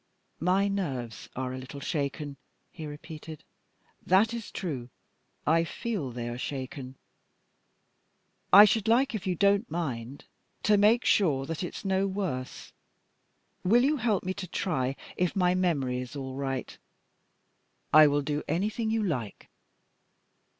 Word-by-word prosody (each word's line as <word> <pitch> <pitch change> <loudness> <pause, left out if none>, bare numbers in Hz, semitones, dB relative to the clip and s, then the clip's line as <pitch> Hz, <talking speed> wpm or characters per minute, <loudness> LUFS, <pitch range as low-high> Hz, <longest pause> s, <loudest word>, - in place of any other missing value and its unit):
"My 185 +4 +2
nerves 135 - -3
are 130 0 -3
a 130 - -5
little 130 +2 -8
shaken," 145 -1 -3 0.3
he 160 -3 -7
repeated. 155 +1 -9 0.6
"That 205 +5 +4
is 230 -2 -5
true; 135 -10 -4 0.6
I 165 +2 +4
feel 195 - -3
they 120 -1 -5
are 120 +1 -5
shaken. 130 -1 -5 1.6
I 205 +2 +11
should 215 +1 +1
like, 245 +4 +3
if 205 -3 -4
you 180 - +1
don't 200 +4 +3
mind, 135 -6 -4 0.4
to 210 - +5
make 215 +4 +4
sure 145 -9 +3
that 165 +2 -4
it's 175 - -6
no 190 0 +2
worse. 185 -10 -4 0.9
Will 235 +7 +5
you 295 +3 +3
help 220 -5 +1
me 185 - -2
to 190 -1 -6
try 135 -7 -1 0.2
if 180 -1 0
my 180 -2 +3
memory 145 -9 0
is 125 +3 -7
all 135 -2 -5
right?" 135 -1 -4 1.1
"I 155 0 +9
will 145 0 +1
do 150 +1 -1
anything 215 +5 -1
you 220 0 +1
like." 125 - -4
165 Hz, 140 wpm, -28 LUFS, 135-200 Hz, 1.6 s, I